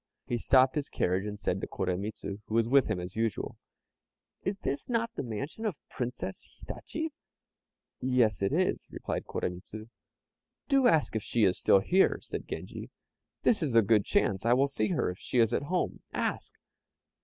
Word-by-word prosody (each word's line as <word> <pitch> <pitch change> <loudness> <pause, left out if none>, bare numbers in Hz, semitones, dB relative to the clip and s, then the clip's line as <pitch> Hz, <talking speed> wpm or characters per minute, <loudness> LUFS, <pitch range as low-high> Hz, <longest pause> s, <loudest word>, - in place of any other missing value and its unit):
He 120 - -1
stopped 130 +2 +5
his 150 -2 -2
carriage, 95 +3 0
and 105 -1 -5
said - - -1
to - - -3
Koremitz, 100 +4 -3
who 100 +1 -4
was 115 0 +3
with 135 +1 +5
him 110 -4 -1
as 90 +1 -6
usual 110 -2 -2 0.8
"Is 195 +1 -3
this 140 - -3
not 230 -1 0
the - - -3
mansion 135 - -5
of 210 -7 -1
the - - -28
Princess 125 -1 -4
Hitachi?" 320 0 -5 0.9
"Yes, 125 -5 +2
it 100 - +1
is," - - +1
replied - - -4
Koremitz. 90 +4 -4 0.9
"Do 275 -3 +4
ask 160 - +3
if 110 - 0
she 115 +2 0
is 95 -3 +3
still 95 - +5
here," 185 - +3
said - - -6
Genji; - - -6 0.5
"this 225 - +3
is 140 -7 0
a 115 - +7
good 105 0 +4
chance; 95 0 +1
I 115 +1 +4
will 135 +3 +4
see 110 -6 0
her - - 0
if 90 - -10
she - - -3
is 115 -1 +4
at - - +1
home 180 0 -1
ask!" - - -2
115 Hz, 180 wpm, -30 LUFS, 105-140 Hz, 0.9 s, a